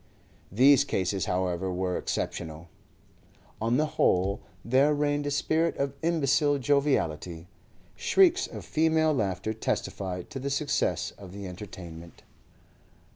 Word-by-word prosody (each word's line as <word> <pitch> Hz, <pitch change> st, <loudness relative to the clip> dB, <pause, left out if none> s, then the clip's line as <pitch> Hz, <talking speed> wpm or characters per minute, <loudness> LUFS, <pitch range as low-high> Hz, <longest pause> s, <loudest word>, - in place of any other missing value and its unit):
These 130 Hz, +6 st, +6 dB
cases, 95 Hz, 0 st, -1 dB
however, 90 Hz, 0 st, -1 dB
were 90 Hz, 0 st, -1 dB
exceptional. 80 Hz, +1 st, -4 dB, 0.9 s
On 115 Hz, +3 st, +2 dB
the 155 Hz, -, +3 dB, 0.2 s
whole 95 Hz, +3 st, +2 dB, 0.2 s
there 135 Hz, +5 st, +4 dB
reigned 145 Hz, 0 st, 0 dB
a -, -, +1 dB
spirit 160 Hz, +3 st, +1 dB
of 140 Hz, -1 st, -1 dB
imbecile 145 Hz, -3 st, +2 dB
joviality. 105 Hz, -, 0 dB, 0.5 s
Shrieks 375 Hz, -1 st, +3 dB
of -, -, -9 dB
female 160 Hz, 0 st, +2 dB
laughter 100 Hz, -3 st, -1 dB
testified 95 Hz, -4 st, -3 dB
to 135 Hz, -, -5 dB
the 140 Hz, +2 st, -3 dB
success 145 Hz, +1 st, 0 dB
of 95 Hz, -3 st, -11 dB
the 100 Hz, 0 st, -7 dB
entertainment. 85 Hz, -3 st, -10 dB
115 Hz, 120 wpm, -28 LUFS, 90-145 Hz, 0.9 s, These